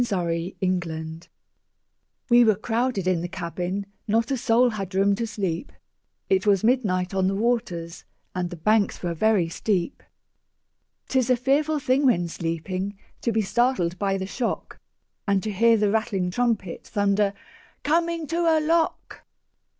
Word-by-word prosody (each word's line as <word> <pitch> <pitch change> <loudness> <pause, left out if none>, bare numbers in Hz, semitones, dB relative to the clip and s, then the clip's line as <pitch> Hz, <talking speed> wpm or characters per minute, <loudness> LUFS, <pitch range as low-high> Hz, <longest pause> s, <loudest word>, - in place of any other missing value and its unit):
Field] 170 -3 -2 1.0
WE 240 0 +8
were 220 -3 +4
crowded 225 -1 -1
in 180 -3 +2
the 175 - -3
cabin, 180 +3 -4 0.2
Not 225 +4 +1
a - - +2
soul 245 0 +3
had 195 -3 -5
room 200 +1 +3
to 230 +3 -2
sleep; 195 - -3 0.6
It 190 +2 +1
was 200 -2 +4
midnight 205 -7 +1
on 190 -1 +1
the 195 - 0
waters, 195 -7 -2 0.3
And 180 -1 -2
the 175 - -7
banks 205 +6 +1
were 175 -1 -1
very 200 0 +2
steep. 185 +5 -2 1.1
'Tis 260 -2 +1
a 255 - +5
fearful 285 +5 +1
thing 275 0 +2
when 175 -8 +2
sleeping 185 +4 -4 0.2
To 235 - 0
be 220 -1 +1
startled 190 -6 +1
by 195 -1 0
the 190 - -3
shock, 235 +5 -4 0.5
And 200 -1 +2
to 215 - -2
hear 230 +3 +4
the 210 -1 +2
rattling 205 -5 0
trumpet 220 -5 -1
Thunder, 200 0 +1 0.5
"Coming 335 +1 +1
to 335 +2 0
a - - +3
lock!" 325 +1 0
200 Hz, 150 wpm, -25 LUFS, 180-240 Hz, 1.1 s, WE